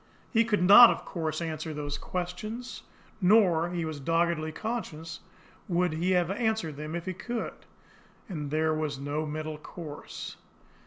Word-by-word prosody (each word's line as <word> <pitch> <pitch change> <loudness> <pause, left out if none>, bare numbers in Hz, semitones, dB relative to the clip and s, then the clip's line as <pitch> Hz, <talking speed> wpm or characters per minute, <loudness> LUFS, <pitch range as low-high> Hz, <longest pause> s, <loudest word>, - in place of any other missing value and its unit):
He 230 -1 +5
could 210 -5 +1
not, 215 +6 +10
of - - -2
course, 160 -2 -3
answer 155 -1 -4
those 145 -1 -4
questions; 215 +7 -5 0.4
nor, 180 -4 +5
he 175 -2 -2
was 155 -2 -5
doggedly 165 +1 +1
conscious, 165 -6 -5 0.5
would 175 -2 +1
he 170 +4 0
have 180 0 +2
answered 220 -7 -1
them 155 +3 -5
if 170 0 -4
he 185 - -2
could 235 +5 -4 0.7
and 150 -8 -4
there 155 +1 +1
was 155 -2 -2
no 145 +3 -3
middle 155 0 -4
course. 155 -2 -8
165 Hz, 150 wpm, -29 LUFS, 155-185 Hz, 0.7 s, not